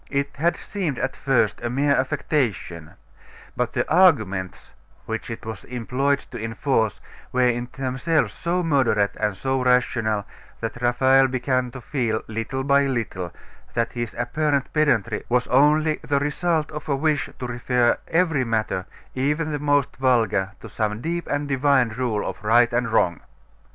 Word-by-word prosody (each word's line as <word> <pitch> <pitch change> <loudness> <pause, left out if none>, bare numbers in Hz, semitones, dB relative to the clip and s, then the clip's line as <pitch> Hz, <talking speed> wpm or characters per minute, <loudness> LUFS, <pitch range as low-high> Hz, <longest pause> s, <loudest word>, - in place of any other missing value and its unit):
It 140 0 -2
had 170 +4 +1
seemed 175 -10 -3
at - - -2
first 125 -6 +1
a 120 - -2
mere 140 +3 +2
affectation; 130 - -2 0.6
but - - -1
the - - 0
arguments 110 - +2 0.3
which 115 0 -4
it 115 0 -7
was 110 -2 -6
employed 130 +4 -1
to 120 -3 -6
enforce 115 -1 0 0.3
were 125 0 +3
in 120 0 -1
themselves 135 +5 0
so 175 +2 -1
moderate 130 -10 +2
and 105 -3 -1
so 130 +3 -1
rational 115 -4 +1 0.3
that 115 +1 -5
Raphael 130 +2 +4
began 130 0 0
to 130 +1 -9
feel, 115 -5 -1
little 115 +4 -3
by 140 0 +3
little, 105 -9 -3 0.4
that 115 -1 0
his 120 -2 -4
apparent 150 -2 0
pedantry 125 -8 +1
was 125 0 +2
only 150 +4 +4
the 140 - 0
result 155 +2 0
of 150 0 -7
a 140 - +2
wish 150 +1 0
to 125 - -5
refer 120 0 +1
every 165 -5 +2
matter, 110 -5 -1 0.3
even 150 +4 0
the 145 - -2
most 145 -1 +1
vulgar, 115 -6 +2
to - - -8
some 105 -1 -2
deep 170 +3 -3
and 145 0 -1
divine 135 -2 +3
rule 110 -2 -2
of - - -6
right 120 +2 +4
and 120 -1 0
wrong. 85 -5 +2
130 Hz, 155 wpm, -23 LUFS, 115-145 Hz, 0.6 s, Raphael